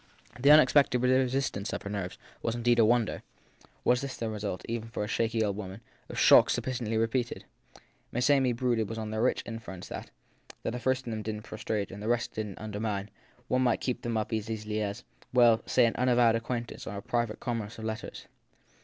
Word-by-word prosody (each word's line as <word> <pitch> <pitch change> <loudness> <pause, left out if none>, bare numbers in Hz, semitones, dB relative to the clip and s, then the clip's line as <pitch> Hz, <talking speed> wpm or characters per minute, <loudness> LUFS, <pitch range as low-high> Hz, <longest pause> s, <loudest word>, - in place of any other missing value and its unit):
The 140 +3 +4
unexpected 145 -3 +6
resistance 130 -4 +1
of - - -4
her 100 - -5
nerves 95 -3 -4 0.2
was 115 - -1
indeed 120 0 +2
a 115 - +7
wonder: 120 0 +2 0.6
was 125 0 +3
that, 140 - -3
then, 115 - -2
the - - -4
result, 100 -3 -4
even 115 0 -4
for 115 - -3
a - - -3
shaky 115 +1 0
old 100 -1 -1
woman, 100 0 -7 0.3
of - - -7
shocks - - +7
sufficiently 120 -4 -2
repeated? 115 +2 -1 0.7
Miss 125 +1 +1
Amy 135 -3 +4
brooded 115 -2 0
on 110 -1 -4
the 110 0 -1
rich 125 - +1
inference 115 -6 -7
that, - - -7 0.5
if - - -1
the 125 - -4
first 130 +2 0
of 120 - -4
them 110 -1 -3
didn 105 0 -4
t - - -16
prostrate 110 -1 -3
and 100 +2 -8
the 105 - -4
rest 120 0 0
didn 105 -3 -4
t - - -14
undermine, 105 -1 -3 0.4
one 130 - +2
might 125 - +2
keep 125 - -2
them 115 -1 -1
up 110 +1 -2
as 110 0 -2
easily 110 -1 -3
as 105 +3 -3 0.3
well, 120 -2 +6
say 125 - +4
an 115 - 0
unavowed 120 -2 +4
acquaint 120 +1 -3
ance - - -9
or 100 - -5
a - - -5
private 120 -2 -1
commerce 115 -3 -4
of 110 - -6
letters. 110 0 -5
115 Hz, 215 wpm, -29 LUFS, 110-125 Hz, 0.7 s, a